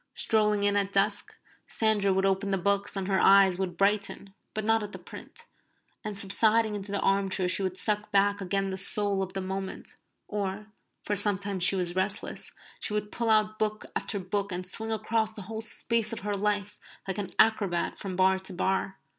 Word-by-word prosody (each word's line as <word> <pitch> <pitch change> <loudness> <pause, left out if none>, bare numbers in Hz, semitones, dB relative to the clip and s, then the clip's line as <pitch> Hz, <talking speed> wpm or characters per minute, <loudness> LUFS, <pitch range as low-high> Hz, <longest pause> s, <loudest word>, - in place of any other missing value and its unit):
Strolling 210 -2 +1
in 205 0 +3
at 200 -1 +1
dusk, 200 +1 +1 0.3
Sandra 215 -3 +2
would 190 +1 +1
open 195 +1 +1
the 195 - +1
books 200 +2 0
and 195 -1 -3
her 190 -1 +2
eyes 195 -2 +5
would 180 -3 -3
brighten 200 0 0 0.2
(but 215 -1 -2
not 225 0 +3
at 205 -1 -7
the - - -6
print), 470 - -12 0.6
and 210 -2 -4
subsiding 215 +3 +2
into 200 -1 -5
the 200 - 0
arm 195 0 +2
chair 185 -1 -1
she 185 - -1
would 185 -1 -2
suck 210 +2 -2
back 200 0 +2
again 195 +1 -1
the 190 - -3
soul 200 0 +4
of 190 -1 -4
the 195 - -3
moment; 190 0 -6 0.3
or, 205 0 -3 0.4
for 205 - -1
sometimes 200 -2 +2
she 195 - +5
was 180 -2 -2
restless, 190 +2 -2 0.4
would 210 -1 -3
pull 235 -1 -2
out 215 0 +2
book 215 0 -1
after 210 - -2
book 200 +2 -3
and 180 0 -4
swing 220 +4 -5
across 220 0 -1
the 210 - -9
whole 220 +3 -6
space 225 0 -1
of 230 - -5
her 205 +1 -2
life 205 0 -1 0.3
like 190 +1 -2
an 195 -2 -3
acrobat 200 -6 +2
from 190 -2 -5
bar 190 +1 +3
to 190 0 -8
bar. 190 +1 -1
200 Hz, 195 wpm, -28 LUFS, 190-210 Hz, 0.6 s, eyes